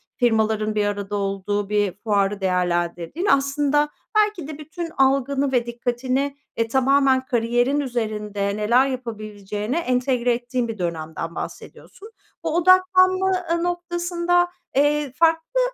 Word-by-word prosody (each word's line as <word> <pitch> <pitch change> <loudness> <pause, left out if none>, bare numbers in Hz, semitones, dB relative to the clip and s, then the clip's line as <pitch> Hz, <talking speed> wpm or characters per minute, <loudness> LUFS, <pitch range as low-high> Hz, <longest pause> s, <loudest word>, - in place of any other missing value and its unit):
firmaların 220 -3 +1
bir 210 -1 +1
arada 205 0 -3
olduğu 200 0 -2
bir 205 -3 +1
fuarı 205 -2 +1
değerlendirdiğin. 175 - -1
Aslında 290 -1 +2 0.3
belki 420 -7 +2
de 305 -2 -7
bütün 315 +3 -6
algını 270 0 +2
ve 245 -2 +1
dikkatini, 255 +3 -2 0.2
e, 230 0 0
tamamen 265 +1 +3
kariyerin 245 +2 +1
üzerinde 210 -6 -2
neler 235 +5 +3
yapabileceğine 215 - -4
entegre 250 -4 +1
ettiğin 240 0 -2
bir 225 -1 -5
dönemden 165 -1 -4
bahsediyorsun. 430 +3 -9 0.3
Bu 310 - -1
odaklanma, 370 +1 +4 0.2
ııı, 335 0 +1
noktasında, 350 0 0 0.3
eee, 290 0 +2
farklı, 330 - +2
250 Hz, 120 wpm, -22 LUFS, 210-295 Hz, 0.3 s, odaklanma